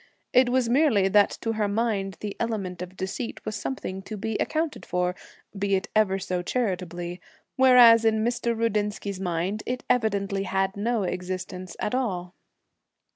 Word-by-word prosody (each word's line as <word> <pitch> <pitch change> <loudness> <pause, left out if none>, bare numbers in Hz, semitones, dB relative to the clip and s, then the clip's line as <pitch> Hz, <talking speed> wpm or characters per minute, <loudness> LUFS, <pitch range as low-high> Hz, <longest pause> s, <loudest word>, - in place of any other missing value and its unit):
It 255 0 +5
was 250 -1 +2
merely 235 -7 +3
that 205 +1 +5
to 225 - -1
her 215 -2 0
mind 200 -2 -1
the 205 -1 -4
element 200 -6 -3
of 180 +1 -8
deceit 190 +6 -5
was 215 - -3
something 195 -4 -4
to 215 +2 -7
be 220 +2 -3
accounted 315 -1 -1
for, 180 0 -1 0.4
be 200 0 +1
it 190 - -2
ever 205 -3 +3
so 185 -2 -2
charitably, 175 -5 -3 0.3
whereas 245 -3 +7
in 220 -1 +2
Mr. 235 -1 0
Rudinsky's 210 -3 -1
mind 180 +3 -2
it 250 0 -3
evidently 200 -5 0
had 195 0 -1
no 220 +1 0
existence 185 0 -4
at 210 - -2
all. 185 -9 -2
205 Hz, 155 wpm, -26 LUFS, 185-230 Hz, 0.4 s, whereas